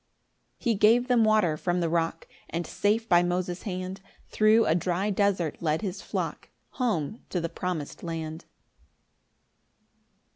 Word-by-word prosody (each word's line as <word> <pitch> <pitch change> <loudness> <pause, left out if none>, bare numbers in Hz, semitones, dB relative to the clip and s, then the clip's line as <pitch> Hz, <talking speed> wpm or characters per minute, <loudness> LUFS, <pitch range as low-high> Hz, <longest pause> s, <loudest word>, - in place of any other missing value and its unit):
10 - - -20
He 235 - +3
gave 225 +4 +4
them 245 -3 +4
water 215 -7 +3
from 175 +3 -1
the 170 - +1
rock; 165 0 -1 0.2
And 170 +1 -3
safe 220 +3 0
by 175 -3 +5
Moses' 180 0 -1
hand 185 0 -5 0.3
Thro' 220 +1 +4
a - - +3
dry 180 +4 0
desert 195 -5 0
led 160 +3 0
his 195 0 -4
flock - - -4 0.3
Home 220 - -1
to 180 - -1
the 165 0 -2
promis'd 170 -3 -4
land. 160 -1 -5
180 Hz, 145 wpm, -27 LUFS, 170-210 Hz, 0.3 s, by